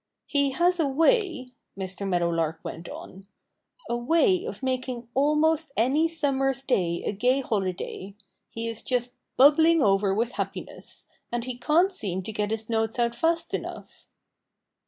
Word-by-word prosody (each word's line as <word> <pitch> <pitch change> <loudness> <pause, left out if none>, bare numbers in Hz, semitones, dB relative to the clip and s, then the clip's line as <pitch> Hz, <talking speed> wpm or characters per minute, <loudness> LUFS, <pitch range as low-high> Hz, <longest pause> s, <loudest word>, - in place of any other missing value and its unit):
"He 280 -1 +1
has 350 +3 +2
a 315 - +2
way" 325 - +2 0.3
Mr. 195 +1 -4
Meadowlark 170 -2 0
went 165 +1 -7
on 195 +1 -10 0.6
"a 235 - -1
way 330 - +2
of 465 - -7
making 255 -2 -2
almost 300 +2 +2
any 275 +8 +3
summer's 270 -4 0
day 175 -10 0
a - - -1
gay 250 +6 +1
holiday. 195 -3 -3 0.3
He 230 0 -5
is 230 -1 -5
just 245 -1 -1 0.2
bubbling 315 +3 +6
over 195 0 +3
with 230 +5 0
happiness; - - -6 0.3
and 240 0 -2
he 255 0 -5
can't 330 +9 +2
seem 190 - -3
to 220 - -6
get 210 -1 -2
his 220 0 -3
notes 225 0 -1
out 235 -1 +1
fast 330 +6 0
enough." - - -6
250 Hz, 150 wpm, -26 LUFS, 210-300 Hz, 0.6 s, bubbling